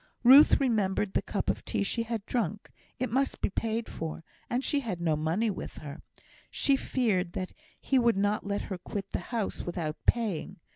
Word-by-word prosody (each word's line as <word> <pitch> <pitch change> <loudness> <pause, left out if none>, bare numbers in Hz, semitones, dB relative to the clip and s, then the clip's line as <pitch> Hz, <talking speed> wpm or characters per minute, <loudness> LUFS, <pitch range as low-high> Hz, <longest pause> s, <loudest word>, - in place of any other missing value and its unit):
Ruth 270 +5 +8
remembered 210 -6 +1
the - - +2
cup - - -3
of - - -1
tea - - -2
that - - +3
she 230 - 0
had 230 -2 -3
drank; 215 -4 -2 0.3
it 255 -3 -2
must 270 +3 0
be - - 0
paid 225 +2 -2
for, 160 0 -5 0.3
and 245 +2 0
she 290 - +1
had 220 -10 -4
no 165 -3 +1
money 165 +9 0
with 185 - -7
her. 145 0 -8 0.5
She 275 - +2
feared 210 -10 0
that 185 - -4 0.3
he 265 - +2
would 235 -4 +3
not 205 +1 +1
let 200 0 -2
her 190 -3 -5
quit 195 +2 -5
the - - -1
house 230 -4 -2
without 165 -3 -3
paying. 220 -9 0
210 Hz, 195 wpm, -29 LUFS, 185-235 Hz, 0.5 s, Ruth